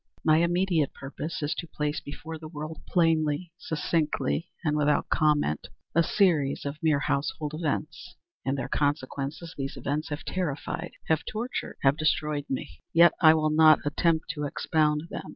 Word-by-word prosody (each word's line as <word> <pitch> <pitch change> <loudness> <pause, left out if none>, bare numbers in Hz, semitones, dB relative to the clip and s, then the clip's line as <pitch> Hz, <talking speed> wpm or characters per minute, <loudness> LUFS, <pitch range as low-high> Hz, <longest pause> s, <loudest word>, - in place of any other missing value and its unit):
My 155 -1 +5
immediate 170 -2 +1
purpose 145 +3 -5
is 145 - 0
to 170 - -6
place 150 -1 -2
before 160 +2 -8
the 155 - -8
world, 155 0 -7
plainly, 165 -1 +1
succinctly, 160 +1 -1
and 150 -3 +1
without 150 0 +2
comment, 150 - +1 0.3
a 170 - +5
series 160 -7 +2
of 145 +2 -5
mere 155 -3 +2
household 145 +1 -1
events. 155 +2 -3 0.3
In 135 - 0
their 135 - -3
consequences, 145 +2 -2
these 135 0 -4
events 150 +3 -2
have 145 0 -5
terrified—have 160 -1 -2
tortured—have 215 - -1
destroyed 150 -1 0
me. 85 - -5
Yet 170 +1 +7
I 160 -2 +8
will 155 -1 +1
not 155 0 +6
attempt 160 +1 +1
to 150 -1 -4
expound 150 +1 +1
them. - - -6
155 Hz, 150 wpm, -27 LUFS, 145-165 Hz, 0.3 s, I